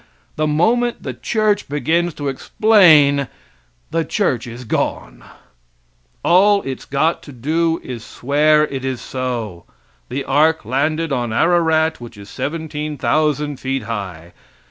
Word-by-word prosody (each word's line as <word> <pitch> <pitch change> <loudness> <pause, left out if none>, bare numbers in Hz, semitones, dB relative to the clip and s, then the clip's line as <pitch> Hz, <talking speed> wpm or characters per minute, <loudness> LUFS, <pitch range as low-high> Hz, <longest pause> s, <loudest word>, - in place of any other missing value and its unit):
The 155 0 0
moment 235 +11 +1
the - - -4
church 215 -6 0
begins 160 +4 0
to 145 - -4
explain 145 - +4 0.6
the 165 0 0
church 135 - -1
is 120 +2 -8
gone. - - -3 1.0
All 200 +3 +4
it's 135 -1 -6
got 155 +4 0
to 145 - -12
do 160 +6 0
is 120 -3 -7
swear 150 +6 +2
it 135 -3 -6
is 130 -2 -3
so. 120 -9 -5 0.4
The 135 +3 -3
ark 155 +1 +2
landed 150 +6 -1
on 120 -3 -1
Ararat, 160 +1 +2
which 120 -3 -10
is 100 0 -12
17,000 150 -1 -2
feet 135 0 -2
high. 90 -7 -6
145 Hz, 125 wpm, -19 LUFS, 125-160 Hz, 1.0 s, explain